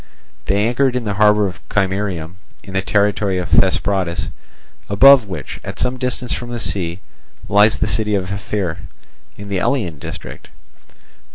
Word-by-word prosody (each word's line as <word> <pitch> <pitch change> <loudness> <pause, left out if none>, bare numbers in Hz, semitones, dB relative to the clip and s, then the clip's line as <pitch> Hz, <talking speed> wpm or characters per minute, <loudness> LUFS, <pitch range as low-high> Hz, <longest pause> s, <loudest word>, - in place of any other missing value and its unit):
They 100 +4 +1
anchored 125 +2 +1
in 125 - -1
the 105 -2 -2
harbour 105 0 +4
of 95 -2 -5
Chimerium, 95 -4 -2 0.3
in 95 - -10
the 95 - +1
territory 100 -1 +1
of 90 -1 -3
Thesprotis, 95 -3 +1 0.6
above 130 +3 +7
which, 90 - -7
at - - -7
some 125 +1 -1
distance 125 -1 -2
from 120 - -5
the 120 -1 -4
sea, 90 -4 -2 0.5
lies 105 +1 +4
the - - 0
city 105 0 0
of 95 -1 -2
Ephyre, 100 -4 -3 0.6
in 100 0 -9
the 100 -2 -1
Elean 90 - -1
district. - - -8
100 Hz, 155 wpm, -18 LUFS, 95-110 Hz, 0.6 s, above